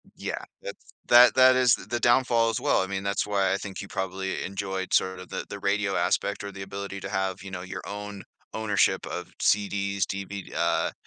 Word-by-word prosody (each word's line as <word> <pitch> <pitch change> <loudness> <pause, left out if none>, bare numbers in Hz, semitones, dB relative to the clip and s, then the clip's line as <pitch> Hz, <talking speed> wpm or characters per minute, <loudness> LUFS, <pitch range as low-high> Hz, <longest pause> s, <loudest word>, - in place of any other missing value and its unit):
Yeah, - - -4 0.2
that's - - -9 0.2
that 120 +1 +8
that 130 0 +7
is 125 -3 +5
th - - -12
the 120 0 -1
downfall 120 -1 +3
as 110 - -2
well. - - +3
I 95 - -2
mean, 95 0 -3
that's 100 0 0
why 100 -2 +1
I 95 - +1
think 100 -1 -7
you 100 - -8
probably 95 0 -3
enjoyed, 95 -1 -4
sort 95 -1 +2
of, 90 - -11
the - - -4
the 100 - -6
radio 100 0 0
aspect 100 0 0
or 100 - -5
the 95 0 -9
ability 100 0 -6
to 95 - -5
have, 95 -2 -2
you 95 - -8
know, 90 -1 -5
your 95 - -6
own 105 -1 -6 0.3
ownership 105 -2 +1
of - - -6
CDs, 100 -1 +1
DV 100 0 -6
uh, - - +1
100 Hz, 210 wpm, -26 LUFS, 95-105 Hz, 0.3 s, that